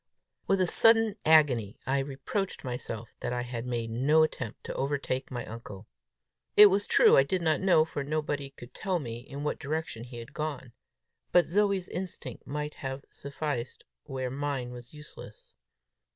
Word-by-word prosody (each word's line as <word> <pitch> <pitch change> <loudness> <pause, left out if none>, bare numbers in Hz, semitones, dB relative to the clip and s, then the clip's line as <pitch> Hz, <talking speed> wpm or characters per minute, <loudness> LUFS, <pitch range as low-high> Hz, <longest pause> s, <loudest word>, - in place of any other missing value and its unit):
With 195 - +3
a 185 - +4
sudden 225 +2 +5
agony, 135 -10 +4
I 135 +1 +1
reproached 145 +8 -3
myself 120 -3 -5
that 120 - -3
I 120 0 -1
had 120 0 -5
made 115 -2 -2
no 145 +7 +4
attempt 130 -7 -4
to - - -5
overtake 135 -1 -2
my 120 -2 -5
uncle. 110 -3 -9 0.7
It 210 -1 +10
was 200 +1 +1
true - - +6
I - - +8
did 175 +5 -1
not 160 -2 +2
know, 180 -5 +5
for 145 -3 -4
nobody 145 -1 -2
could 120 -3 -13
tell 190 -2 -1
me, 120 -7 -5
in 140 +3 -8
what 150 - -2
direction 150 -5 -4
he 120 0 -10
had 120 +5 -9
gone; 145 -5 -4 0.6
but 175 -1 +5
Zoe's 195 0 +1
instinct 185 -1 -6
might 150 +1 -3
have 135 0 -6
sufficed 140 -3 -4 0.2
where 130 -1 -4
mine 135 -2 -3
was 120 0 -10
useless! 475 - -12
140 Hz, 165 wpm, -29 LUFS, 125-160 Hz, 0.7 s, It